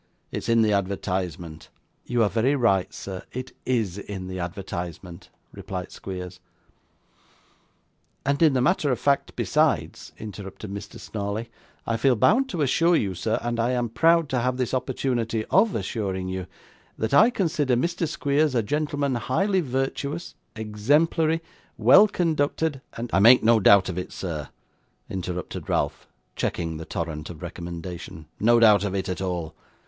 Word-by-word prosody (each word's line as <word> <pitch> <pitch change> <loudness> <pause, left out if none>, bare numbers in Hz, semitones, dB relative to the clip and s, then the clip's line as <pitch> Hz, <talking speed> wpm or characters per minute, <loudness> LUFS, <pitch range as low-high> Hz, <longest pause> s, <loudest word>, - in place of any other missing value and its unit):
'It's - - -4
in 115 -1 +5
the 105 -1 +2
advertisement.' 90 -4 -3 0.4
'You 120 -1 +2
are 105 - +2
very 125 +6 +2
right, 100 -8 +2
sir; 95 -1 -7
it 130 +1 -5 0.2
IS 110 -7 0
in 100 -2 -6
the 95 0 -5
advertisement,' 85 0 -6 0.2
replied 90 -1 -6
Squeers. 90 -1 -7 1.9
'And 140 +2 +1
in 160 -4 +6
the 130 - +2
matter 150 -1 +2
of 125 - -1
fact 140 -1 +1
besides,' - - 0
interrupted 100 -1 -8
Mr. 100 0 -8
Snawley. 105 +2 -4 0.3
'I 115 - 0
feel 130 +2 +3
bound 250 - +3
to 170 - -1
assure 165 +6 +3
you, 100 -10 0
sir, 110 +5 -1
and 120 0 -2
I 120 +2 +1
am 120 -2 0
proud 165 +7 +3
to 130 - 0
have 125 +1 0
this 125 -1 -2
opportunity 120 -4 -1
OF 200 +3 +4
assuring 95 -3 -3
you, 95 -1 -4 0.5
that 110 +3 -2
I 220 +11 +7
consider 160 - +1
Mr. 170 +6 0
Squeers 145 -1 +1
a 115 - +2
gentleman 145 +2 -1
highly 190 - +1
virtuous, 140 +3 -3 0.2
exemplary, 150 +10 +1 0.3
well 215 - +7
conducted, 160 -5 0
and 115 +1 -6
' - - -15
'I - - +4
make 120 +5 +7
no 115 0 +5
doubt 100 -1 +6
of 90 -1 -3
it, 90 - -6
sir,' 80 -6 -5 0.6
interrupted 90 -1 -5
Ralph, - - -1 0.3
checking 80 -2 -2
the 80 - -7
torrent 80 -2 -4
of 85 0 -9
recommendation; 85 -1 -7
'no 120 +2 +5
doubt 105 -3 +6
of 100 -1 -2
it 95 - -2
at 90 0 -3
all. 90 -4 -3
110 Hz, 155 wpm, -25 LUFS, 95-140 Hz, 1.9 s, I